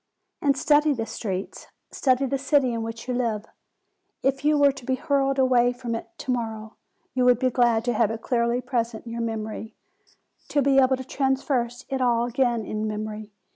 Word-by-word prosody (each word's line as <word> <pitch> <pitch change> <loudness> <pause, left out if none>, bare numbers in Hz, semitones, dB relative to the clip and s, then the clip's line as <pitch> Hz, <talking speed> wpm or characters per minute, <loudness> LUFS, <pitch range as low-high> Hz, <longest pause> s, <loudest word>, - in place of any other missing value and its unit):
And 280 -2 +2
study 295 +1 +4
the 225 -4 -3
streets; 195 -3 -5 0.2
study 260 0 +2
the 270 +1 -1
city 275 -3 +2
in 230 - -2
which 225 +1 -6
you 250 - -1
live. 230 -4 -1 0.8
If 270 +1 0
you 300 0 +3
were 285 -1 +5
to 275 -1 -11
be 260 +2 0
hurled 275 -1 +1
far 265 - +4
away 245 -1 +4
from 245 -1 -5
it 225 - -4
to 260 - -3
morrow, 220 -3 -4 0.4
you 255 - +1
would 250 -1 +6
be 255 +1 +1
glad 235 -2 +2
to 245 - +1
have 225 -3 +2
it 225 0 -5
clearly 235 0 +1
present 235 -3 -2
in 230 - -7
your 235 0 -3
memory, 220 0 -4 0.7
to 285 - +1
be 270 0 +4
able 260 0 +4
to 260 - -6
traverse 265 -2 -1
it 265 -1 -2
all 240 -1 +2
again 240 -2 0
in 215 0 -3
memory. 215 0 -5
245 Hz, 200 wpm, -25 LUFS, 225-265 Hz, 0.8 s, would